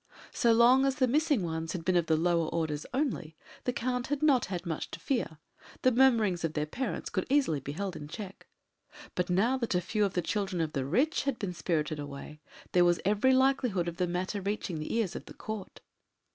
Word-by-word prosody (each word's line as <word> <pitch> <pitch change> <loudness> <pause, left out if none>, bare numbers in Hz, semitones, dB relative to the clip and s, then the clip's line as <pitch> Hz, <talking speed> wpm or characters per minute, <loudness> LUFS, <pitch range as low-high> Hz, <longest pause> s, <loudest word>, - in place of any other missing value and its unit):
So 235 - +3
long 240 +4 +6
as 270 - +1
the 255 -2 +2
missing 290 - +2
ones 160 -1 -3
had 165 -3 -5
been 185 - +2
of 170 -2 +2
the 160 - +3
lower 170 0 +2
orders 155 -3 -2
only, 250 - -2 0.3
the 250 - +2
Count 250 +1 -2
had 290 +1 -2
not 275 -6 +4
had 180 -1 -5
much 165 -3 -3
to - - -8
fear 235 - -2 0.5
the 255 - +5
murmurings 230 -8 +3
of 165 -1 -1
their 150 -1 -1
parents 240 +9 -4
could 185 - -1
easily 270 - +2
be 140 +1 -6
held 190 +2 -4
in 145 - -7
check 195 +4 -8 0.7
but 180 0 -1
now 220 +9 +2
that 235 -7 -1
a - - +4
few 210 +4 -1
of 195 -2 0
the 175 - +1
children 195 -2 -1
of 160 -2 -1
the 135 -3 -1
rich 275 - +1
had 275 -4 0
been 190 -3 -3
spirited 155 -2 -1
away, 145 +1 -8 0.3
there 180 - +5
was 175 0 +3
every 210 +6 +3
likelihood 260 -9 +2
of 170 0 -4
the 180 - +1
matter 185 +3 -2
reaching 195 -4 -3
the 155 - -5
ears 220 -6 0
of - - -6
the - - -12
Court. 215 -3 -7
185 Hz, 220 wpm, -30 LUFS, 165-245 Hz, 0.7 s, long